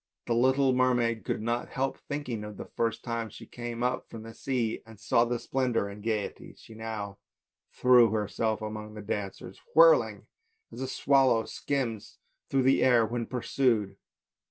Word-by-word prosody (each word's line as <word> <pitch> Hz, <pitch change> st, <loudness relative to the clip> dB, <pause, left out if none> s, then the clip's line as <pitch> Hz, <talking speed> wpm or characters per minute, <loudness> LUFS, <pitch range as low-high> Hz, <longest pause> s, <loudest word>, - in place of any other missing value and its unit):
The 120 Hz, -, 0 dB
little 130 Hz, +2 st, +3 dB
mermaid 120 Hz, -3 st, +2 dB
could -, -, -2 dB
not 120 Hz, +1 st, -1 dB
help 135 Hz, 0 st, -2 dB
thinking 130 Hz, -7 st, -4 dB
of 105 Hz, -1 st, -8 dB
the -, -, -6 dB
first 115 Hz, -1 st, -2 dB
time 115 Hz, -1 st, -3 dB
she -, -, -11 dB
came 120 Hz, 0 st, -6 dB
up 125 Hz, +1 st, -1 dB
from 115 Hz, -1 st, -8 dB
the 115 Hz, 0 st, -9 dB
sea 120 Hz, -4 st, -2 dB
and 110 Hz, -2 st, -15 dB
saw 115 Hz, +3 st, +3 dB
the 120 Hz, 0 st, -1 dB
same -, -, -12 dB
splendour 125 Hz, -6 st, 0 dB
and 100 Hz, +1 st, -9 dB
gaiety; 110 Hz, -2 st, -2 dB
and -, -, -14 dB
she 115 Hz, -, -14 dB
now 110 Hz, -3 st, -6 dB, 0.5 s
threw 125 Hz, -2 st, +5 dB
herself 110 Hz, +1 st, -1 dB
among 110 Hz, 0 st, -6 dB
the 105 Hz, -, -7 dB
dancers, 100 Hz, -2 st, -5 dB
whirling, -, -, +5 dB, 0.5 s
as -, -, -8 dB
a 130 Hz, -, -2 dB
swallow 130 Hz, -4 st, +3 dB
skims 125 Hz, -7 st, -3 dB, 0.3 s
through 135 Hz, -1 st, +2 dB
the 135 Hz, +1 st, +4 dB
air 120 Hz, -3 st, +5 dB
when 115 Hz, +1 st, -3 dB
pursued. 115 Hz, -5 st, 0 dB
115 Hz, 175 wpm, -29 LUFS, 110-130 Hz, 0.5 s, threw